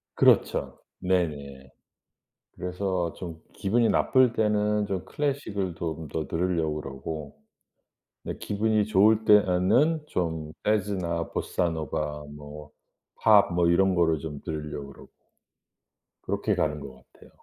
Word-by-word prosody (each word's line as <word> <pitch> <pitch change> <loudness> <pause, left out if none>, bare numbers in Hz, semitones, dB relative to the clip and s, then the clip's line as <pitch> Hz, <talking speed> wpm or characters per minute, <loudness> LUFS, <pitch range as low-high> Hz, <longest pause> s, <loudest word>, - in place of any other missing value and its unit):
그렇죠. - - +3 0.2
네네. 75 -8 -2 0.9
그래서 90 -1 -2
좀 85 -3 -8
기분이 115 +4 +1
나쁠 130 -3 +3
때는 105 -1 +1
좀 95 -3 -3
클래식을 105 - -2
좀 80 -1 -4
더 80 - -3
들으려고 80 -3 0
그러고 70 +2 -7 0.9
네 - - -5
기분이 105 0 0
좋을 110 +2 +4
때에는 105 - +4
좀 80 -3 -3
재즈나 95 -5 -1
보사노바 75 -3 -2
뭐 75 0 -10 0.5
팝 105 -5 +6
뭐 85 -1 +3
이런 95 +2 +3
거를 80 -3 +2
좀 75 -3 -7
들으려고 75 -3 -5
그러고. - - -16 1.1
그렇게 - - -1
가는 75 -1 0
것 65 -2 -11
같아요. - - -18
90 Hz, 245 characters per minute, -27 LUFS, 75-105 Hz, 1.1 s, 팝